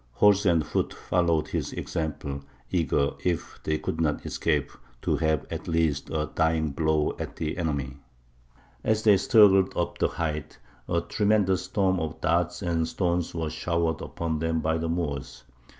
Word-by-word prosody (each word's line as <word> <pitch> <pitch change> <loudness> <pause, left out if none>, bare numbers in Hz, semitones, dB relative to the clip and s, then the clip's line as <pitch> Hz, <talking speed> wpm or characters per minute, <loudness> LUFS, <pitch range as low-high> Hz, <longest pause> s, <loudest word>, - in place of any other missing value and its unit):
Horse 100 - +4
and 85 -3 +3
foot - - -1
followed 85 -3 +1
his - - -2
example, 75 -3 -4 0.3
eager, 75 -5 +1
if 85 -3 -2
they 80 0 0
could 80 +1 -3
not 75 -2 0
escape, 75 -4 0 0.3
to - - +2
have 80 -3 +1
at - - -5
least 80 -4 0
a 75 -1 -1
dying 80 -1 +1
blow 80 +1 +1
at - - -5
the 80 -1 -3
enemy. 70 -6 -2 0.9
As 110 0 +1
they 105 -2 +7
struggled 95 -1 +5
up 85 - -2
the - - +3
height, 75 -2 -4 0.3
a 85 - +2
tremendous 95 0 +1
storm 95 -1 +1
of 80 -2 -4
darts 85 +3 0
and 85 -2 0
stones 85 -2 -1
was 80 -2 -2
showered 85 -1 -1
upon 80 -2 -3
them 80 0 0
by 80 +1 0
the 80 0 -2
Moors. 75 -7 -3
80 Hz, 160 wpm, -27 LUFS, 80-90 Hz, 0.9 s, they